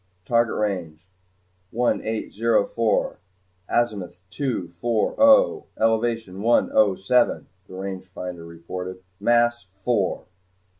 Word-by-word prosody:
"Target 115 Hz, 0 st, +2 dB
range 90 Hz, -5 st, -3 dB, 0.6 s
one 120 Hz, +3 st, 0 dB
eight 110 Hz, 0 st, -4 dB
zero 115 Hz, -1 st, +2 dB
four, 115 Hz, -2 st, 0 dB, 0.5 s
azimuth 100 Hz, -7 st, -1 dB
two 125 Hz, -8 st, -2 dB
four 110 Hz, +6 st, -1 dB
oh, 280 Hz, -1 st, +5 dB
elevation 115 Hz, -3 st, 0 dB
one 120 Hz, +2 st, +3 dB
oh 105 Hz, -3 st, +4 dB
seven," 120 Hz, +6 st, +2 dB, 0.2 s
the 95 Hz, -, -11 dB
rangefinder 90 Hz, -2 st, -7 dB
reported. 90 Hz, +2 st, -7 dB, 0.2 s
"Mass 120 Hz, +1 st, +2 dB
four." 100 Hz, +2 st, -1 dB
105 Hz, 105 wpm, -23 LUFS, 95-120 Hz, 0.6 s, oh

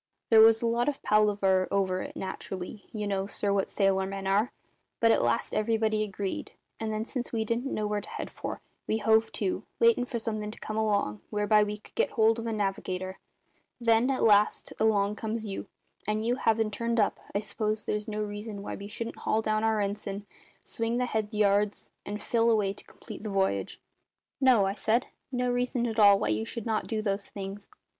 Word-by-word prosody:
"There 220 Hz, -1 st, +9 dB
was 225 Hz, +1 st, +6 dB
a -, -, +2 dB
lot 235 Hz, +3 st, +2 dB
of 285 Hz, -, -5 dB
palaver 200 Hz, -3 st, +3 dB
over 185 Hz, -2 st, +1 dB
it, -, -, -7 dB
naturally 190 Hz, +1 st, -6 dB
you 210 Hz, -2 st, -3 dB
know, 195 Hz, -1 st, -1 dB
sir, 200 Hz, 0 st, 0 dB
what 195 Hz, -1 st, 0 dB
sailor 195 Hz, -1 st, +2 dB
men 195 Hz, 0 st, -5 dB
are 200 Hz, +4 st, +2 dB, 0.5 s
but 230 Hz, 0 st, +5 dB
at -, -, +3 dB
last 120 Hz, 0 st, 0 dB
everybody 220 Hz, 0 st, +1 dB
agreed; 200 Hz, -2 st, -4 dB, 0.3 s
and 220 Hz, -1 st, -2 dB
then, 215 Hz, +1 st, -2 dB
since 245 Hz, 0 st, -4 dB
we 225 Hz, -2 st, -1 dB
didn't 235 Hz, +5 st, -1 dB
know 215 Hz, -, -1 dB
where 210 Hz, 0 st, -1 dB
to -, -, -8 dB
head -, -, -5 dB
for, -, -, -6 dB, 0.3 s
we 220 Hz, -, +1 dB
hove 220 Hz, +1 st, +3 dB
to, 195 Hz, -3 st, -1 dB, 0.2 s
waitin' 235 Hz, +1 st, +4 dB
for 250 Hz, -1 st, -3 dB
something 215 Hz, -2 st, -3 dB
to 215 Hz, -, -10 dB
come 215 Hz, -, -5 dB
along 205 Hz, -, 0 dB
whereby 210 Hz, 0 st, +3 dB
we 210 Hz, 0 st, -3 dB
could 210 Hz, -, -19 dB
get -, -, +1 dB
hold 225 Hz, 0 st, +3 dB
of 230 Hz, -, -4 dB
a -, -, -1 dB
navigator. 190 Hz, -2 st, -2 dB, 0.6 s
Then, 230 Hz, +1 st, +3 dB
at 265 Hz, -, 0 dB
last, 210 Hz, -1 st, +3 dB
along 210 Hz, -1 st, +2 dB
comes 220 Hz, 0 st, -3 dB
you, 195 Hz, -2 st, -5 dB, 0.4 s
and 215 Hz, +1 st, 0 dB
you 245 Hz, +2 st, +1 dB
havin' 225 Hz, -3 st, +2 dB
turned 230 Hz, +2 st, -1 dB
up, 205 Hz, -, +2 dB, 0.2 s
I -, -, +3 dB
s'pose 215 Hz, +1 st, -2 dB
there's 210 Hz, +1 st, -2 dB
no 215 Hz, -1 st, -2 dB
reason 205 Hz, 0 st, -6 dB
why -, -, -5 dB
we 200 Hz, -, -7 dB
shouldn't 230 Hz, +2 st, -5 dB
haul 220 Hz, +1 st, 0 dB
down 215 Hz, 0 st, +1 dB
our 220 Hz, -1 st, +2 dB
ensign, 200 Hz, 0 st, -3 dB, 0.4 s
swing 230 Hz, +1 st, -2 dB
the 250 Hz, -, +1 dB
head 220 Hz, -3 st, -2 dB
yards, 205 Hz, -1 st, +1 dB, 0.2 s
and 210 Hz, +1 st, -4 dB
fill 230 Hz, 0 st, +2 dB
away 210 Hz, -4 st, +2 dB
to -, -, -11 dB
complete -, -, -11 dB
the 215 Hz, -, -4 dB
v'yage?" 190 Hz, -, 0 dB, 0.6 s
"No," 250 Hz, -7 st, +5 dB
I 195 Hz, -, 0 dB
said; 225 Hz, +4 st, +1 dB, 0.3 s
"no 250 Hz, -1 st, 0 dB
reason 245 Hz, 0 st, 0 dB
at 225 Hz, -1 st, -2 dB
all 200 Hz, -1 st, +8 dB
why 105 Hz, -, -1 dB
you 110 Hz, 0 st, 0 dB
should 215 Hz, -, -6 dB
not 220 Hz, -2 st, -1 dB
do 220 Hz, -1 st, -2 dB
those 200 Hz, -1 st, -1 dB
things. 195 Hz, 0 st, -7 dB
215 Hz, 205 wpm, -29 LUFS, 200-225 Hz, 0.6 s, There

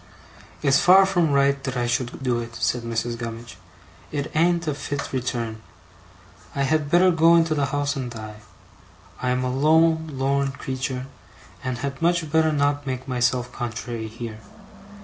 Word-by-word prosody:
'It's 140 Hz, -2 st, +4 dB
far 190 Hz, 0 st, +7 dB
from 175 Hz, -5 st, +1 dB
right 140 Hz, 0 st, +2 dB
that 130 Hz, -1 st, -3 dB
I 120 Hz, -, 0 dB
should 120 Hz, +2 st, -2 dB
do 125 Hz, -2 st, +1 dB
it,' 115 Hz, 0 st, -7 dB
said 125 Hz, -, 0 dB
Mrs. 115 Hz, 0 st, -3 dB
Gummidge. 115 Hz, -3 st, -7 dB, 0.5 s
'It 145 Hz, 0 st, -3 dB
an't 170 Hz, +1 st, +2 dB
a 150 Hz, -, +1 dB
fit 140 Hz, 0 st, -5 dB
return. 120 Hz, -3 st, -3 dB, 0.9 s
I 140 Hz, -, +1 dB
had 145 Hz, +1 st, +1 dB
better 180 Hz, +3 st, +5 dB
go 165 Hz, 0 st, +5 dB
into 165 Hz, -1 st, +3 dB
the 145 Hz, -2 st, 0 dB
house 145 Hz, +1 st, -1 dB
and 130 Hz, -3 st, -3 dB
die. 110 Hz, -2 st, -8 dB, 0.8 s
I 125 Hz, -, 0 dB
am 125 Hz, 0 st, 0 dB
a 125 Hz, 0 st, -1 dB
lone 160 Hz, +2 st, +3 dB
lorn 135 Hz, +1 st, 0 dB
creetur', 130 Hz, -1 st, -4 dB, 0.6 s
and 130 Hz, -1 st, -2 dB
had 140 Hz, 0 st, -5 dB
much 170 Hz, -2 st, +1 dB
better 160 Hz, 0 st, +3 dB
not 145 Hz, -1 st, 0 dB
make 130 Hz, 0 st, -4 dB
myself 125 Hz, -1 st, 0 dB
contrary 115 Hz, -1 st, -5 dB
here. 110 Hz, 0 st, -7 dB
135 Hz, 165 wpm, -24 LUFS, 120-155 Hz, 0.9 s, far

